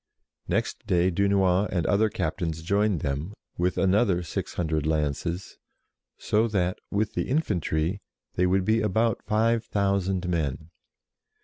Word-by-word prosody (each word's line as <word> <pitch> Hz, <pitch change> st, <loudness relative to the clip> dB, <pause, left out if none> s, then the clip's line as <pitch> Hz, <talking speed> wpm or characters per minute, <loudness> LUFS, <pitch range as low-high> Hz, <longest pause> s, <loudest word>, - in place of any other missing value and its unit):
Next -, -, -2 dB
day 90 Hz, +1 st, +3 dB
Dunois 100 Hz, +1 st, +2 dB
and 85 Hz, -3 st, 0 dB
other 105 Hz, +2 st, +3 dB
captains 80 Hz, -5 st, -3 dB
joined 100 Hz, 0 st, +1 dB
them 75 Hz, +8 st, -3 dB, 0.2 s
with 90 Hz, +1 st, +1 dB
another 95 Hz, -2 st, +2 dB
six 85 Hz, -, -5 dB
hundred 80 Hz, -3 st, -1 dB
lances, 80 Hz, +4 st, -2 dB, 0.6 s
so 110 Hz, +2 st, +1 dB
that, 95 Hz, -4 st, -1 dB
with 105 Hz, +1 st, -1 dB
the -, -, -2 dB
infantry, 95 Hz, -, 0 dB, 0.3 s
they 90 Hz, -, +2 dB
would 95 Hz, 0 st, +2 dB
be 110 Hz, +2 st, +2 dB
about 110 Hz, +2 st, +1 dB
five 115 Hz, +1 st, +1 dB
thousand 100 Hz, -3 st, 0 dB
men. 80 Hz, -2 st, -2 dB
95 Hz, 130 wpm, -26 LUFS, 85-105 Hz, 0.6 s, day